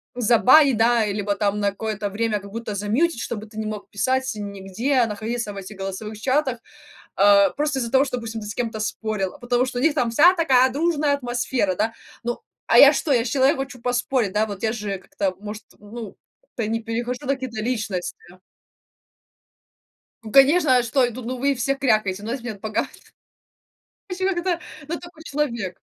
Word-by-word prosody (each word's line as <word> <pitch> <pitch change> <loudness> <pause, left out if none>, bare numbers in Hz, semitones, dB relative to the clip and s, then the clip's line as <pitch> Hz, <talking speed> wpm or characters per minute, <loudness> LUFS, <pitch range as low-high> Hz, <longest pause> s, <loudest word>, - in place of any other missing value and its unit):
забанить, 250 +3 +5
да, 230 0 +3
и - - -1
либо 205 0 -1
там 205 0 0
на 200 -1 +1
какое-то 210 0 -4
время 215 0 -1
как 200 0 -12
будто 230 -2 -5
замьютить, 230 - 0
чтобы 220 -1 -5
ты 215 0 -14
не 220 - -3
мог 215 -1 -6
писать 260 +6 0
нигде, 205 +6 -1
находиться 220 +1 -4
в - - -10
этих 195 +2 -8
голосовых 195 +3 -6
чатах, 260 0 0 0.6
а, 200 -1 +6
просто 295 +2 -1
из-за 235 -2 -2
того, 270 +2 +4
что, 250 - -3
допустим, 230 -2 -5
ты 210 - -8
с 210 - -5
кем-то 225 -3 -3
спорил, 215 -3 -2
а - - -14
потому 245 -1 +1
что 250 -1 -4
у - - -2
них 320 -1 +4
там 245 -6 +1
вся 320 +10 +6
такая 260 -6 +4
дружная 300 0 +1
атмосфера, 240 -6 -1
да. 220 +4 0 0.3
Ну, 240 0 -3 0.3
а 235 - +5
я 280 +3 +9
что, 290 0 0
я 235 -2 +3
ж - - -2
человек, 270 +2 +3
хочу 260 -3 -6
поспорить, 245 -4 0
да, 215 +1 +1
вот 200 -2 -7
я 220 - +1
же 210 -4 -4
как-то, 190 0 -3
может, 210 +1 -7
ну, 210 +1 -9 0.2
как-то - - -7
и 210 - -1
не 225 0 -2
перехожу 240 +4 -4
на 275 - +2
какие-то 255 -5 -6
личности. 215 -7 -2 2.1
Ну 215 - -8
конечно, 275 0 +6
а 245 - +2
что 250 +2 +2
я 240 - -3
тут? 250 +1 -8
Ну, 255 +2 -3
вы 275 +2 +1
все 265 +3 0
крякаете, 215 -7 +1
ну, 225 - -4
если 250 -2 -4
мне 205 -2 -7
погас. 215 0 -2
Ну, - - -21 1.1
в - - -10
общем, 375 - +2
это 350 -3 0
ка 350 -2 0 0.3
ну, 335 +1 -3
такой 345 -2 -13
человек. 235 - -3
235 Hz, 205 wpm, -23 LUFS, 210-265 Hz, 2.1 s, я